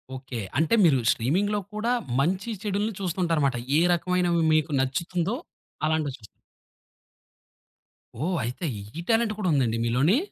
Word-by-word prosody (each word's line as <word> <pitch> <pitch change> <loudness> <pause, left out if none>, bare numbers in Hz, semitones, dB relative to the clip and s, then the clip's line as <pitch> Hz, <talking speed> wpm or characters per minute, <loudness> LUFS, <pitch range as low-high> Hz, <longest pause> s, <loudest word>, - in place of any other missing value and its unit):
Okay. 130 -2 -6 0.2
అంటే 160 +9 +3
మీరు 155 -6 +5
స్ట్రీమింగ్‌లో 195 - +1
కూడా 220 +3 -1 0.3
మంచి, 185 +8 0
చెడులుని 210 +1 -1
చూస్తూ 185 -2 -3
ఉంటారు 165 -3 +1
మాట. 130 - -1 0.2
ఏ - - +5
రకమైనవి 175 -1 +1
మీకు 155 -1 +2
నచ్చుతుందో 170 - -1 0.5
అలాంటివి 155 -3 0
చూస్త్ 110 - -14 2.0
ఓహ్! 180 +4 0
అయితే 125 +9 -4 0.3
ఈ - - -3
టాలెంట్ 225 -1 +3
కూడా 210 -4 -2
ఉందండి 125 -6 +2
మీలోని? 130 - +3
170 Hz, 135 wpm, -26 LUFS, 140-195 Hz, 2.0 s, మీరు